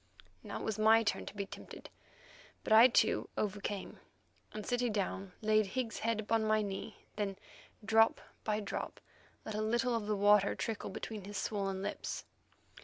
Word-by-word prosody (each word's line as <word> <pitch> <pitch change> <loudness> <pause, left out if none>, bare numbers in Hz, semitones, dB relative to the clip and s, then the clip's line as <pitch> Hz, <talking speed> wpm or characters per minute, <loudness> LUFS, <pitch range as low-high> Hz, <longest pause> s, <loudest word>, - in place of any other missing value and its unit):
Now - - -6
it - - -6
was 220 -1 -2
my 220 +1 +6
turn 210 - -1
to - - -7
be 200 -1 -2
tempted, - - -10 0.7
but - - +2
I, 225 +3 +10
too, 225 -3 +2
overcame, 205 -1 -3 0.5
and, 215 -1 -6
sitting 245 -1 0
down, 195 -2 -2
laid 215 -1 +3
Higgs's 240 0 -3
head 230 -1 0
upon 220 +1 +1
my 215 0 +2
knee; 195 -1 -6
then, 200 -2 -2 0.5
drop 225 +1 +4 0.2
by 215 0 0
drop, 200 - -5 0.5
let 215 - -4
a 215 - -1
little 240 +3 +1
of 225 -3 -1
the 210 - +1
water 205 0 +5
trickle 225 -3 -3
between 205 +1 -6
his 205 0 -6
swollen 195 -2 -2
lips. 205 - -4
215 Hz, 170 wpm, -34 LUFS, 200-225 Hz, 0.7 s, I